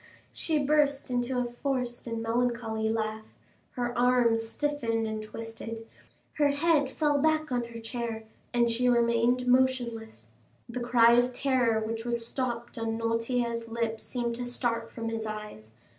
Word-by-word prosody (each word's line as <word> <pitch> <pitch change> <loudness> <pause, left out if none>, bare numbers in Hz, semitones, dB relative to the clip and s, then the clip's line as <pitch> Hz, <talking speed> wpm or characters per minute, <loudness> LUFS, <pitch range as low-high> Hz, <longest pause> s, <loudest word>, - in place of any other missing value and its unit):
She 320 -2 0
burst 285 -2 +2
into 245 +1 0
a 250 - +1 0.2
forced 250 -4 -2
and 230 -1 -3
melancholy 225 -2 0
laugh, 220 -1 -3 0.4
her 240 -1 -2
arms 245 -2 +3
stiffened 235 -6 -1
and 220 0 -3
twisted, 225 +1 -7 0.5
her 290 - +5
head 285 -1 +2
fell 295 -1 +1
back 310 0 +2
on 245 -1 0
her 235 0 -8
chair, 230 -1 -4 0.3
and 235 -1 +2
she 250 +2 +2
remained 235 +1 +3
motionless. 245 -3 +1 0.4
The 245 +1 -5
cry 240 -1 +5
of 245 +1 +4
terror 245 -4 +2
which 225 0 -3
was 235 -1 -1
stopped 240 -2 -3
on 225 0 -1
Noirtier's 230 0 -1
lips, 225 -1 -2
seemed 240 -2 -2
to 245 0 -4
start 230 -2 -1
from 230 -1 -4
his 225 -1 -3
eyes. 210 - -7
235 Hz, 150 wpm, -29 LUFS, 225-250 Hz, 0.5 s, her